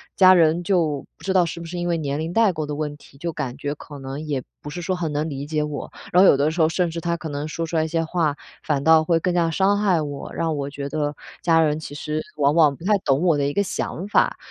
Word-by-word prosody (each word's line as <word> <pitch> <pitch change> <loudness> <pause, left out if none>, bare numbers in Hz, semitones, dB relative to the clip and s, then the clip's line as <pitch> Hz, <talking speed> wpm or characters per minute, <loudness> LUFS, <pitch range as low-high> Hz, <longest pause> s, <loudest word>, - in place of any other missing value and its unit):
家 185 -1 +8
人 165 +1 +3
就 165 -7 0
不 - - -18
知 190 - 0
道 185 -2 +5
是 170 +1 -5
不 170 - -7
是 175 +2 -6
因 175 - -2
为 170 -1 +1
年 145 -1 -2
龄 160 +2 -3
代 220 -5 +4
沟 155 -2 -3
的 145 0 -4
问 150 -1 -3
题， 135 - -18
就 170 +3 -3
感 130 -5 -4
觉 145 0 -3
可 145 -1 -11
能 135 +2 -6
也 145 -4 -3 0.2
不 150 - -7
是 175 +3 -6
说 185 +2 -1
很 165 -4 -2
能 150 +2 -1
理 140 0 -5
解 155 -1 0
我， 150 -1 -5 0.2
然 180 - +6
后 - - +8
有 135 - +5
的 150 +3 +2
时 165 0 -1
候 160 - +4
甚 175 +1 0
至 165 0 -5
他 170 -1 -1
可 160 - -6
能 145 +1 -4
说 165 +2 -3
出 165 - -5
来 160 - +3
一 - - -2
些 165 0 0
话， 160 -3 0 0.3
反 140 -2 0
倒 160 0 +6
会 165 0 +2
更 180 +1 0
加 170 -2 +2
伤 195 +4 +2
害 190 -5 +3
我， 145 -2 -6
让 160 -2 -1
我 140 0 -3
觉 140 0 -5
得 150 0 -2 0.3
家 165 -1 +4
人 155 -1 +2
其 145 -2 -8
实 150 +1 -3 0.2
往 145 0 +3
往 155 -4 +4
不 165 - -14
太 210 -1 +4
懂 140 -2 +1
我 170 -4 +4
的 140 - +1
一 145 - -2
个 200 - +2
想 190 0 -4
法。 - - +2
160 Hz, 315 characters per minute, -23 LUFS, 145-170 Hz, 0.3 s, 家